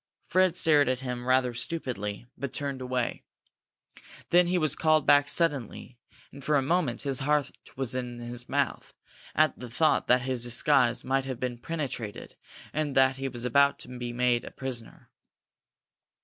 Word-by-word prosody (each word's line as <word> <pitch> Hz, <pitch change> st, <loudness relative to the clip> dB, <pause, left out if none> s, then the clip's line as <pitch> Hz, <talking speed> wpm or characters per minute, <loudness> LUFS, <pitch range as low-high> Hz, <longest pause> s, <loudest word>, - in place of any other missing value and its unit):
Fred 185 Hz, -2 st, +3 dB
stared 150 Hz, -6 st, +4 dB
at 130 Hz, 0 st, -1 dB
him 125 Hz, -1 st, -5 dB
rather 130 Hz, -1 st, +3 dB
stupidly, 120 Hz, -6 st, -4 dB
but 140 Hz, +1 st, -5 dB
turned 140 Hz, -2 st, -4 dB
away. 125 Hz, -1 st, -2 dB, 1.1 s
Then 175 Hz, 0 st, +5 dB
he 180 Hz, +1 st, +1 dB
was 155 Hz, -5 st, +1 dB
called 155 Hz, -2 st, +3 dB
back 145 Hz, 0 st, +5 dB
suddenly, 135 Hz, -7 st, -2 dB, 0.3 s
and 140 Hz, 0 st, -12 dB
for 150 Hz, +2 st, +1 dB
a 140 Hz, -, +4 dB
moment 150 Hz, -5 st, 0 dB
his 135 Hz, -2 st, 0 dB
heart 145 Hz, 0 st, +1 dB, 0.3 s
was 130 Hz, -2 st, -2 dB
in 125 Hz, -1 st, -4 dB
his 120 Hz, +1 st, -6 dB
mouth 140 Hz, -1 st, -1 dB, 0.4 s
at 155 Hz, 0 st, +3 dB
the 125 Hz, -, -7 dB
thought 155 Hz, +6 st, +2 dB
that 125 Hz, 0 st, +4 dB
his 130 Hz, -2 st, -2 dB
disguise 125 Hz, 0 st, +2 dB
had 135 Hz, -1 st, -1 dB
been 125 Hz, -2 st, -3 dB
penetrated 130 Hz, -8 st, -5 dB, 0.4 s
and 150 Hz, -2 st, -2 dB
that 135 Hz, 0 st, +4 dB
he 135 Hz, 0 st, -3 dB
was 120 Hz, -2 st, -4 dB
about 140 Hz, +3 st, +4 dB
to 125 Hz, 0 st, -9 dB
be 120 Hz, -1 st, -4 dB
made 120 Hz, 0 st, +1 dB
a -, -, -7 dB
prisoner. 130 Hz, -4 st, -7 dB
130 Hz, 165 wpm, -28 LUFS, 125-145 Hz, 1.1 s, Then